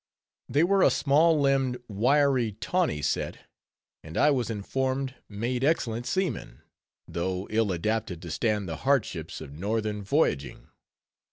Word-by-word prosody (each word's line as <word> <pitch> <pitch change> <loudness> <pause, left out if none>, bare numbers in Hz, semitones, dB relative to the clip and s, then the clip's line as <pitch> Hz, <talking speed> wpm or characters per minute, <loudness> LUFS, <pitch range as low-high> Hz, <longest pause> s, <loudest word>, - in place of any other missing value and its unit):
They 145 +3 +3
were 195 +2 +3
a - - +7
small 155 +3 +3
limbed, 135 -3 +2
wiry, 125 +2 +2
tawny 135 - -1
set; - - -2 0.6
and 80 +1 -8
I 150 - +5
was 125 -5 0
informed 130 +5 -2 0.2
made 120 +5 -2
excellent 120 -6 0
seamen, 185 -1 -2 0.5
though 90 +2 -2
ill 110 -2 +2
adapted 95 0 -2
to 85 - -6
stand 105 +2 0
the 80 -2 -4
hardships 110 - -1
of 70 -3 -9
northern 105 +5 -2
voyaging. 85 - 0
115 Hz, 135 wpm, -27 LUFS, 100-140 Hz, 0.6 s, a